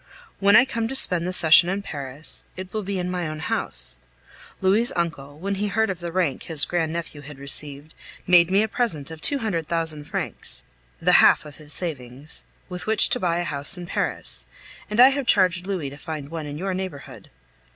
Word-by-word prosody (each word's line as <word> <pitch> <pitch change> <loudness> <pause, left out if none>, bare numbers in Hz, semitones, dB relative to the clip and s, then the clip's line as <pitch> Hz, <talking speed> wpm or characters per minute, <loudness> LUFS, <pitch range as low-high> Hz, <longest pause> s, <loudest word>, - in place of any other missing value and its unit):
When 200 +1 +5
I 250 - +8
come 230 -4 -2
to 265 - -2
spend 180 -9 +5
the - - -1
session 170 0 +5
in 195 +2 -2
Paris, 140 -2 -7
it 185 0 -8
will 215 - -1
be 200 0 -3
in 180 0 -2
my 180 -2 -2
own 155 0 -5
house. 60 - -3 0.6
Louis' 205 +6 +2
uncle, 145 -4 -3
when 195 +5 -3
he 210 - +1
heard 220 +1 +1
of 180 - -6
the 170 -1 -5
rank 170 -7 0
his 160 -3 +3
grand 165 -3 -1
nephew 165 -3 -5
had 145 0 -11
received, 140 +2 -4 0.3
made 175 -2 +5
me 195 +3 +3
a - - 0
present 180 - -2
of 160 -1 -9
two 285 - +4
hundred 185 - -2
thousand 160 -3 -2
francs - - -5 0.3
(the - - +2
half - - +5
of 150 -1 -11
his 150 -1 -9
savings) 140 -4 -3 0.2
with 180 +2 -7
which 220 -1 +4
to - - +3
buy 170 -2 0
a 175 - -1
house 145 +3 -1
in 175 - -7
Paris, - - -3 0.4
and 210 +2 -2
I 255 +2 +10
have 275 -2 -2
charged 185 -3 +3
Louis 175 -9 -3
to 140 - -10
find 150 -1 -6
one 160 -2 -5
in 145 0 -6
your 190 +3 -2
neighborhood. 185 -7 -7
170 Hz, 210 wpm, -24 LUFS, 150-195 Hz, 0.6 s, I